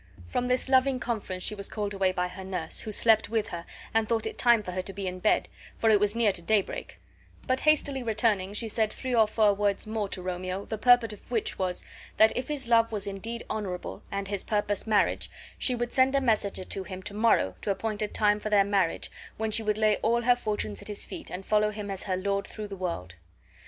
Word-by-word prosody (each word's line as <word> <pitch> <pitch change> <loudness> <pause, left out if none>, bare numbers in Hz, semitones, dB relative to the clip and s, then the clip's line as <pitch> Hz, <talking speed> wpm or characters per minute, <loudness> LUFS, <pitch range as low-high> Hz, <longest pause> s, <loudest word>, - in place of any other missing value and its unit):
From 245 - -2
this 250 +1 +1
loving 260 0 +3
conference 205 -6 -3
she - - +1
was 200 -1 -5
called 205 -1 -3
away 190 -1 +2
by 180 -1 -1
her 190 +1 -9
nurse, 190 -1 -3
who 220 - -4
slept 220 0 +4
with 220 -1 -1
her 170 0 -6 0.3
and 225 -1 +1
thought 225 -2 +1
it - - -4
time 235 -3 +5
for 180 - -5
her 185 +1 -2
to 195 +1 -8
be 195 +1 -5
in 185 0 -4
bed, 210 - +2 0.3
for 225 - +3
it 210 - +5
was 205 +1 +1
near 230 -3 +4
to 175 - -4
daybreak; 200 +3 -1 0.5
but, 255 0 +1
hastily 290 -3 +2
returning, 215 -4 +1
she 225 +2 -1
said 220 0 0
three 255 -1 -4
or 225 -2 +5
four 215 -1 +3
words 200 0 0
more 215 -2 -2
to 185 - -5
Romeo 185 +2 -4
the 220 - -5
purport 245 -3 +5
of 205 - -12
which 230 -3 -1
was, 185 -1 -2 0.3
that 220 0 +6
if 250 - -2
his 285 -4 -1
love 230 -1 +4
was 210 -2 -2
indeed 220 +4 -5
honorable, 190 -4 -4
and 200 0 -3
his 200 -1 -2
purpose 205 0 -1
marriage, 215 -2 +2 0.3
she 250 - +2
would 240 0 -3
send 265 +1 +4
a - - +5
messenger 215 -6 0
to 190 +1 -4
him 185 -1 -8
to 205 - -4
morrow 205 - +3
to - - -3
appoint 215 +1 -2
a 210 - +1
time 210 0 +2
for 215 - -4
their 205 -2 +4
marriage, 195 -4 0 0.3
when 220 0 -1
she 220 - +4
would 210 -1 0
lay 215 -1 +3
all 235 +1 +1
her 245 +1 +5
fortunes 210 - -2
at - - -7
his 210 -1 -2
feet 330 - -7
and 185 +2 -6
follow 210 0 +3
him 210 -1 -5
as 195 - -4
her 185 -2 -1
lord 200 +1 -1
through 215 -1 -7
the 200 - -6
world. 90 - -5
210 Hz, 240 wpm, -28 LUFS, 195-230 Hz, 0.5 s, that